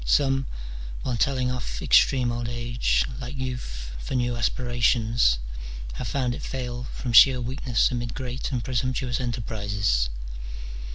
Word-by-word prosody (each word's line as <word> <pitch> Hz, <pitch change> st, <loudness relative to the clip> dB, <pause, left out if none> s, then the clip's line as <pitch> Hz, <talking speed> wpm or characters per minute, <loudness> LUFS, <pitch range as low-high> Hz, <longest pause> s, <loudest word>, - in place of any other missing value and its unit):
Some, 135 Hz, -, +2 dB, 0.6 s
while 125 Hz, -, -1 dB
telling 125 Hz, +3 st, +1 dB
off 120 Hz, -, -4 dB
extreme 125 Hz, -3 st, +4 dB
old 120 Hz, 0 st, -3 dB
age, 120 Hz, 0 st, +1 dB
like 130 Hz, +2 st, -6 dB
youth, 125 Hz, -, -5 dB
for 95 Hz, -, -4 dB
new 120 Hz, -1 st, +1 dB
aspirations, 120 Hz, -, +2 dB, 0.6 s
have -, -, -4 dB
found 130 Hz, -3 st, 0 dB
it -, -, -6 dB
fail 125 Hz, -2 st, -4 dB
from 125 Hz, -1 st, -4 dB
sheer 130 Hz, +2 st, +9 dB
weakness 125 Hz, 0 st, +1 dB
amid 120 Hz, -2 st, -3 dB
great 130 Hz, +1 st, -4 dB
and 125 Hz, -3 st, -1 dB
presump 130 Hz, 0 st, 0 dB
tuous 125 Hz, -2 st, -1 dB
enterprises. 100 Hz, -, 0 dB
120 Hz, 135 wpm, -26 LUFS, 115-130 Hz, 0.6 s, sheer